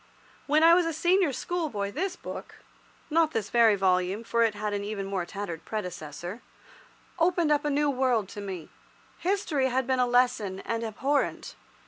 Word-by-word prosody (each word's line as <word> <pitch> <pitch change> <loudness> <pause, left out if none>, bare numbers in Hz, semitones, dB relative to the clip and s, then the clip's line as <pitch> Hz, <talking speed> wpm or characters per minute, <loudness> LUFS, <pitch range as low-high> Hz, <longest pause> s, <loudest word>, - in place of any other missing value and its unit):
When 305 +2 +4
I 335 +1 +8
was 345 -1 +4
a 330 - -1
senior 350 +1 +3
schoolboy 260 - -3
this 370 - -2
book—not 325 -2 -4
this 215 -2 -2
very 230 -3 +5
volume, 190 +2 +1
for 235 0 0
it 225 -2 +3
had 210 0 -3
an 200 0 -2
even 200 -1 -4
more 190 -3 -3
tattered 185 -4 -6
predecessor—opened 215 - -4
up 295 -1 +3
a - - +2
new 290 0 +2
world 250 -6 +1
to 205 - -7
me. 185 -5 -6 0.5
History 345 -8 0
had 260 +1 0
been 260 0 +1
a 250 - +3
lesson 245 -6 +2
and 230 0 -3
abhorrent. 270 +6 -1
235 Hz, 160 wpm, -27 LUFS, 200-300 Hz, 0.5 s, I